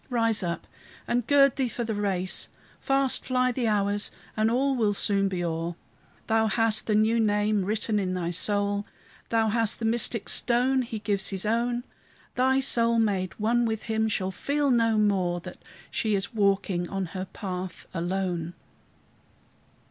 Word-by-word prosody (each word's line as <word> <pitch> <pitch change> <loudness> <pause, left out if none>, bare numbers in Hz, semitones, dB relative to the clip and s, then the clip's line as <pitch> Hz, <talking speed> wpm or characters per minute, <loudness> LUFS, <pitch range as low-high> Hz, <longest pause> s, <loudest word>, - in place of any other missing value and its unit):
rise 230 -3 +1
up! 170 -2 -3 0.4
and 240 -1 0
gird 275 -2 +4
thee 265 -2 +1
for 240 0 -4
the 225 -1 -3
race! 195 -3 -1 0.3
Fast 270 -1 +1
fly 255 -1 +1
the 245 -1 -1
hours, 205 -1 +1 0.3
and 215 0 +2
all 265 +3 +1
will 215 -4 +1
soon 195 -1 +2
be 185 -2 -3
o'er. 165 0 -3 0.5
Thou 220 0 +2
hast 220 -1 +2
the 215 - +2
new 220 +2 +3
name 210 -1 +1
written 210 +2 0
in 185 -2 -2
thy 175 -1 -2
soul; 205 +2 0 0.4
Thou 225 -1 +2
hast 225 0 +1
the 230 - -4
mystic 230 -1 +1
stone 255 +2 +3
He 230 -2 -5
gives 205 -2 0
his 195 0 -2
own. 240 +2 0 0.5
Thy 260 +1 +2
soul, 235 -3 +4
made 195 -5 0
one 235 +3 +2
with 220 -2 -2
him, 220 -1 0
shall 190 -3 -1
feel 285 +7 0
no 230 -2 +3
more 190 -4 +1
That - - -11 0.3
she 215 -2 0
is 195 +3 -3
walking 195 -4 0
on 195 -1 -2
her 185 -1 -4
path 185 -1 -6
alone. 175 -1 -2
215 Hz, 165 wpm, -26 LUFS, 195-235 Hz, 0.5 s, gird